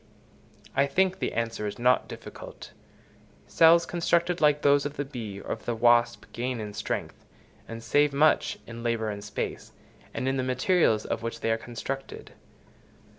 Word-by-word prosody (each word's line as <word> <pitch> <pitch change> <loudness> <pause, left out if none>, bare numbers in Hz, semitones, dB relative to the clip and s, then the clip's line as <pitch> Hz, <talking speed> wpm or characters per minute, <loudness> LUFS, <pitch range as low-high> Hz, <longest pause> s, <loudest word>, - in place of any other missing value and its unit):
I 140 +1 +3
think 190 +5 +1
the - - -2
answer 115 -2 -2
is 100 - -5
not 125 +1 +3
difficult: - - -10 0.7
cells 165 +1 +5
constructed 170 0 0
like 150 -1 +3
those 140 0 +4
of 145 0 -5
the 145 - -2
bee 115 -8 -7
or - - -4
the 115 +1 -4
wasp 120 0 +3
gain 125 0 -3
in 105 -1 -6
strength, 100 - -4 0.4
and 115 0 -8
save 145 +3 +3
much 150 +3 +2
in 115 0 -9
labour 115 -2 -1
and 100 0 -7
space, 105 - -5 0.4
and 130 - -3
in 135 0 0
the 130 - 0
materials 130 - +2
of - - -3
which 115 0 -5
they 115 - +1
are 115 - +2
constructed. 125 +4 -7
125 Hz, 165 wpm, -27 LUFS, 115-145 Hz, 0.7 s, cells